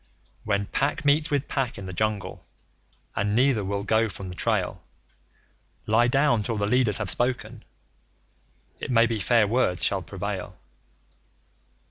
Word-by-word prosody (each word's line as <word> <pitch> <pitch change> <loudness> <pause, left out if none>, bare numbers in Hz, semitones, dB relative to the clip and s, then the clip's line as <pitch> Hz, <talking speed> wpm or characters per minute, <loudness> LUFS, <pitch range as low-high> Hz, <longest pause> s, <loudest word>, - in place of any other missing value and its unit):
When 100 -2 0
Pack 140 +7 -1
meets 150 +2 +3
with 145 -1 0
Pack 135 -4 -2
in 100 - -7
the 95 - -6
Jungle, 105 +1 -2 0.7
and 100 +1 0
neither 125 -3 +3
will 100 +1 -2
go 110 +1 +2
from 95 -1 -8
the 90 - -8
trail, - - -1 1.0
Lie 115 +3 +3
down 135 -3 +3
till 110 +1 -2
the 100 - 0
leaders 115 -2 +2
have 105 - -3
spoken 120 -2 -2 1.2
it - - -5
may 115 -2 +5
be 115 -2 -2
fair 115 +1 +3
words 100 -6 +1
shall - - +1
prevail. - - -5
110 Hz, 145 wpm, -25 LUFS, 100-125 Hz, 1.2 s, may